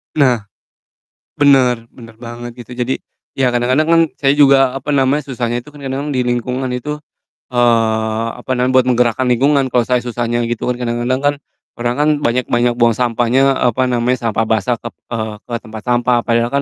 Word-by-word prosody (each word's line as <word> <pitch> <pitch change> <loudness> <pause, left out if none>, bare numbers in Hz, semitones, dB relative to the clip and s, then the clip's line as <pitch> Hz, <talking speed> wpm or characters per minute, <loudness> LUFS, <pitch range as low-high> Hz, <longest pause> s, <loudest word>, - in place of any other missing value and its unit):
Nah. 125 -7 +2 0.9
Bener 130 -5 +3
bener 115 -3 -14
banget 120 0 -9
gitu. 125 - -12
Jadi, 125 +1 -2 0.4
ya 130 -2 +2
kadang-kadang 125 +5 +2
kan 165 +1 +4 0.2
saya 135 -1 +2
juga, 135 -3 +5
apa 135 +2 -8
namanya, 140 +1 +2
susahnya 120 -2 -2
itu 120 - -17
kan 145 -2 -12
kadang-kadang 135 +2 -3
di 125 - +1
lingkungan 125 +1 -2
itu, 150 +4 -4 0.6
eee, 115 -2 +1
apa 130 - -2
namanya, 125 +1 +1
buat 130 -1 +4
menggerakkan 125 +1 +1
lingkungan 135 +2 +2
kalo 120 -1 +1
saya 125 0 +1
susahnya, 120 0 -2
gitu 120 -2 -3
kan. 125 0 -2
Kadang-kadang 120 +2 -1
kan 145 0 +2 0.4
orang 120 0 -1
kan 150 - +3 0.2
banyak 120 +1 0
banyak 120 0 +2
buang 115 -2 +4
sampahnya, 125 +3 +2
apa 130 0 +1
namanya, 125 0 +1
sampah 110 +1 -1
basah 115 +2 0
kep 115 - -8 0.2
eee, 110 -2 -3
ke 120 - -6
tempat 110 -1 -10
sampah, 120 0 +2
padahal 115 0 +1
125 Hz, 175 wpm, -16 LUFS, 120-130 Hz, 0.9 s, juga